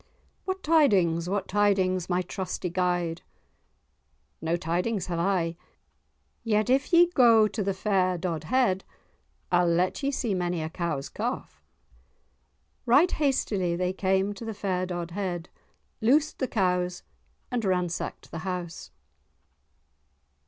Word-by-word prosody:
"What 375 0 -3
tidings, 190 - +3
what 200 +1 -1
tidings, 190 -3 +1
my 180 0 +1
trusty 185 -1 -4
guide?" 175 -2 -1 1.2
"No 165 +1 0
tidings 180 +6 -1
have 170 -2 -3
I—yet 195 +5 -3
if 275 +5 +2
ye 345 0 +7
go 230 -7 +6
to 210 - -4
the 195 -1 -1
fair 185 -2 +1
Dodhead, 185 - 0 0.7
I'll 175 0 +4
let 175 - +1
ye 275 - 0
see 250 -6 -1
many 175 -3 -1
a 155 - -4
cow's 165 -6 -3
calf." - - -5 1.3
Right 290 +10 +5
hastily 205 - 0
they 180 +1 -1
came 190 +1 +1
to 205 - -10
the 225 -1 -5
fair 185 -2 -1
Dodhead, 175 0 -4 0.5
loosed 285 +7 +2
the 260 - 0
cows 180 -4 0 0.5
and 245 -2 -1
ransacked 180 -3 -2
the 165 - -5
house. 180 -1 -5
185 Hz, 120 wpm, -27 LUFS, 175-215 Hz, 1.3 s, ye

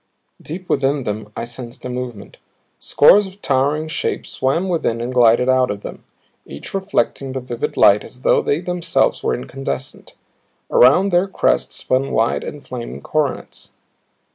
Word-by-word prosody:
Deep 180 +4 -7
within 140 0 +1
them 105 -1 -5
I - - -3
sensed 120 +1 -9
a - - -3
movement. 125 -4 -6 0.4
Scores 200 +7 +5
of 190 +1 -14
towering 145 +3 +1
shapes 155 - -3
swam 140 +8 0
within 160 -10 -1
and 120 +2 -4
glided 120 0 +4
out 130 -1 +3
of 100 0 -4
them, - - -9 0.4
each 70 - -9
reflecting 190 -8 -1
the 130 - -2
vivid 120 -2 -5
light 100 +1 +5
as 125 - -13
though - - +3
they 145 +4 0
themselves 175 -2 0
were - - 0
incandescent. 135 0 -6 0.6
Around 160 +11 +5
their 175 +2 +3
crests 195 - 0
spun 130 +2 -1
wide 115 -3 +1
and 150 - -8
flaming 120 -2 -7
coronets. 150 -3 -3
130 Hz, 155 wpm, -19 LUFS, 120-155 Hz, 0.6 s, Scores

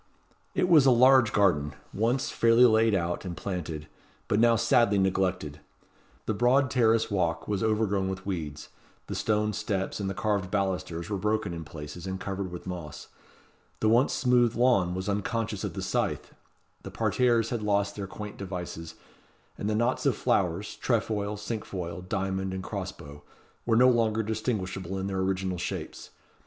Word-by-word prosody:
It 180 - +2
was 155 -6 +6
a - - +8
large 130 -1 +6
garden, 85 -9 +2 0.2
once 120 +6 0
fairly 115 +2 +5
laid 110 -2 +4
out 85 -1 -1
and 90 -3 -6
planted, 80 -6 -5 0.4
but 105 - +1
now 115 0 +5
sadly 115 -2 +3
neglected. 95 -6 0 0.7
The 110 - 0
broad 125 +5 +3
terrace 115 -3 +3
walk 85 -4 0
was 100 -2 -1
overgrown 105 -3 +1
with 95 -1 -5
weeds; 80 -6 -5 0.4
the - - -6
stone 105 0 0
steps 100 -2 -2
and 100 -1 -2
the 95 - -4
carved 100 -3 -1
balusters 95 -3 -2
were 100 - -1
broken 105 -2 -1
in 85 -1 -5
places, 75 +3 -8
and 95 0 -4
covered 95 -1 -4
with 90 - -8
moss; 85 -5 -7 0.7
the 110 - +2
once 120 +5 +4
smooth 125 -3 +2
lawn 110 -8 +3
was 95 +1 -4
unconscious 105 +2 -2
of - - -4
the - - -4
scythe; - - -2 0.5
the - - -8
parterres 115 +1 +1
had 120 -3 -2
lost 100 -1 0
their 100 -2 -5
quaint 105 +1 -8
devices; 90 -4 -6 0.6
and 105 - -3
the 110 - 0
knots 120 +3 +1
of - - +2
flowers - - 0
tre - - +2
foil, 105 -1 -3
cinque 105 +1 -4
foil, 90 -2 -5
diamond, 95 0 -2
and 95 - -5
cross 95 -2 -4
bow 75 -4 -12 0.5
were 115 -1 +3
no 125 +2 +7
longer 110 -2 +2
distinguishable 95 -4 -3
in 95 - -3
their 95 -1 -2
original 95 -1 -1
shapes. - - -5
100 Hz, 170 wpm, -28 LUFS, 95-110 Hz, 0.7 s, a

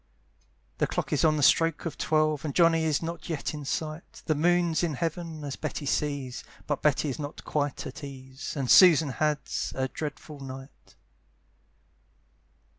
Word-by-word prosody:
The - - +2
clock - - -2
is - - +2
on 155 -1 +4
the 145 - 0
stroke 165 +4 +4
of 165 - -3
twelve, 155 -2 +1
And 150 -3 -4
Johnny 165 -2 +4
is 155 0 +1
not 165 0 -5
yet 155 -3 -2
in 150 -2 -6
sight, 155 +3 -5
The 155 - +2
moon's 170 +1 +2
in 165 -4 -1
heaven, 165 +1 -4
as 140 -2 -4
Betty 145 - -4
sees, 140 -3 -2 0.2
But 145 -2 -2
Betty 150 0 +2
is 135 - -4
not 145 0 -6
quite 145 -2 -2
at 145 +4 -8
ease; 135 0 -7
And 135 -2 -1
Susan 165 -5 +8
has 150 +1 -1
a 130 0 0
dreadful 150 +1 -7
night. 135 0 -10
150 Hz, 165 wpm, -28 LUFS, 140-160 Hz, 0.2 s, Susan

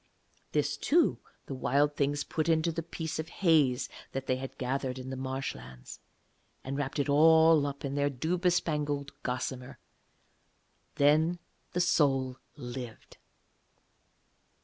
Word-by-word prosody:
This, - - 0
too, 335 +3 +2 0.3
the - - -6
Wild 145 +3 +1
Things 145 0 0
put 160 +1 -2
into 165 +1 +2
the 165 +1 -3
piece 160 -1 -5
of 160 - -4
haze 150 -8 +2 0.3
that 135 0 -3
they 130 - 0
had 135 +1 -7
gathered 130 0 -2
in 130 0 -7
the - - -3
marshlands, 130 - -6 0.6
and 135 +1 -4
wrapped 145 +1 -3
it 140 - 0
all 160 +1 +6
up 140 0 -6
in 140 - -3
their 145 0 +1
dew 160 +7 -2
bespangled 150 -5 0
gossamer. 125 0 -4 1.2
Then 155 +4 +3 0.4
the 180 - +1
soul 135 -6 +2 0.2
lived. 120 -4 -8
140 Hz, 130 wpm, -30 LUFS, 130-160 Hz, 1.2 s, all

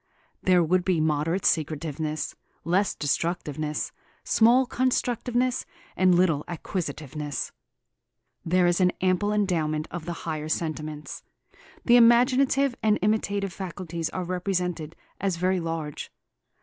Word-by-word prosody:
There 180 -2 +4
would 180 +3 +2
be 180 -3 +1
moderate 155 +4 0
secretiveness, 155 0 -1 0.3
less 185 +4 +1
destructiveness, 155 0 -2 0.3
small 240 +4 +4
constructiveness, 250 0 0 0.3
and 185 -1 +4
little 165 -5 +2
acquisitiveness. 150 - -4 0.9
There 180 +2 +3
is 175 +1 +2
an 180 -1 +4
ample 185 +2 +1
endowment 165 -7 0
of 175 -2 -6
the 175 - -3
higher 155 -1 -3
sentiments. 155 -2 -4 0.6
The 240 0 +7
imaginative 255 +3 +4
and 215 -1 +3
imitative 200 -2 0
faculties 170 -3 -4
are 185 - -4
represented 180 -3 -2 0.2
as 195 -2 0
very 185 +1 +1
large. 165 -3 -4
175 Hz, 110 wpm, -26 LUFS, 155-200 Hz, 0.9 s, The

